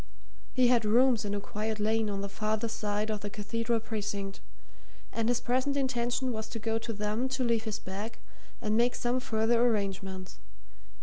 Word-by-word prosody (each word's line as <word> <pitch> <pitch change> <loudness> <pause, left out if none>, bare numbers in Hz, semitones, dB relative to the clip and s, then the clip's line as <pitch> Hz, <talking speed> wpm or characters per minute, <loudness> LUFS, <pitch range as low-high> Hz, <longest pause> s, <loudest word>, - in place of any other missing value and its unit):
He 255 -2 +5
had 240 -2 +4
rooms 235 +1 +4
in 205 0 -1
a - - 0
quiet 215 +2 -3
lane 220 +1 +2
on 200 -1 -2
the 200 - -2
farther 215 +2 -1
side 210 0 -1
of 210 - -1
the 205 - -3
Cathedral 230 +3 -1
precinct, 205 -3 -3 0.7
and 230 0 +1
his 245 0 +3
present 260 +3 +1
intention 255 -1 +1
was 220 0 -4
to - - -4
go 225 0 0
to 230 - -4
them 210 +4 -1
to 260 0 0
leave 230 -2 +2
his 215 -2 -1
bag 205 +4 -5 0.4
and 215 -2 0
make 240 +2 +3
some 245 +1 +1
further 230 0 +2
arrangements. 195 -4 -1
220 Hz, 180 wpm, -30 LUFS, 210-240 Hz, 0.7 s, He